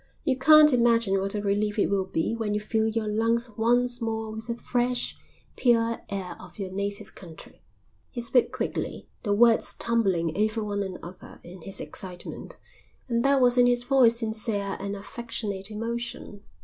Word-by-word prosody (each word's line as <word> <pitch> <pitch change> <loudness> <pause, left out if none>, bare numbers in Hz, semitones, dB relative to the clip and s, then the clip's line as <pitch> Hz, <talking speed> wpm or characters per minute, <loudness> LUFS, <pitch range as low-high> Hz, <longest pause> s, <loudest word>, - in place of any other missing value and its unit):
You 270 -4 +1
can't 300 +2 +7
imagine 230 -5 +3
what 195 +2 -2
a 205 - -2
relief 205 +1 0
it 205 - +3
will 195 -1 0
be 165 +4 -1
when 215 -2 -2
you - - +1
fill 220 +1 0
your 220 0 -1
lungs 230 +2 0
once 245 +2 +1
more 220 -1 -3
with 220 +1 -7
the 235 0 -3
fresh, 245 0 -1 0.4
pure 230 -2 +2
air 195 -2 -4
of - - -13
your 195 -3 -5
native 200 +1 -4
country." 165 -4 -12 0.5
He 250 - -6
spoke 240 +1 +2
quickly, - - -4
the 205 - -2
words 230 +1 +4
tumbling 190 -9 0
over 215 +2 0
one 205 -1 -2
another 185 -2 -8
in 180 +1 -11
his 195 +3 -5
excitement, 180 -2 -7 0.5
and 235 0 +1
there 275 0 +4
was 250 -1 +4
in 245 - +6
his 245 0 +2
voice 245 -3 +4
sincere 215 -3 -2
and 200 +1 -4
affectionate 205 -2 -5
emotion. 230 -1 -5
220 Hz, 170 wpm, -26 LUFS, 200-235 Hz, 0.5 s, can't